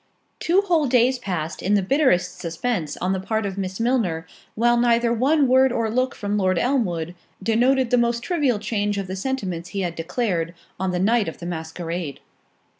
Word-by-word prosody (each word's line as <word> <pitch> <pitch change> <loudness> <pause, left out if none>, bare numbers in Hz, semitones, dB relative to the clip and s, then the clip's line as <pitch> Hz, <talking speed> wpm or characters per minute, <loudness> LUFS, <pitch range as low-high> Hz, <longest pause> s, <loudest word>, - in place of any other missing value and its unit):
Two 360 +4 +3
whole 340 -7 +2
days 250 +1 +3
passed 175 -8 -4
in 200 +3 +2
the 200 - +2
bitterest 260 - +2
suspense 170 0 -2
on 185 +1 0
the 190 - -1
part 220 +3 -2
of 195 -2 -3
Miss 190 0 -4
Milner, 225 -9 0 0.3
while 240 +2 +3
neither 235 0 +3
one 275 +5 +3
word 260 +1 +5
or 230 -2 -1
look 255 +2 0
from 205 0 -2
Lord 185 -2 +2
Elmwood, 175 - 0 0.3
denoted 245 +4 +2
the 250 - +4
most 235 0 +1
trivial 290 -10 +1
change 205 -1 -1
of 195 - -2
the 185 +1 -5
sentiments 190 -7 -3
he 200 - -3
had 175 -3 -2
declared, 170 -1 -2 0.2
on 190 0 0
the 180 - -1
night 215 +3 +2
of 160 - -5
the 170 - -8
masquerade. 165 -2 -5
210 Hz, 190 wpm, -23 LUFS, 180-245 Hz, 0.3 s, word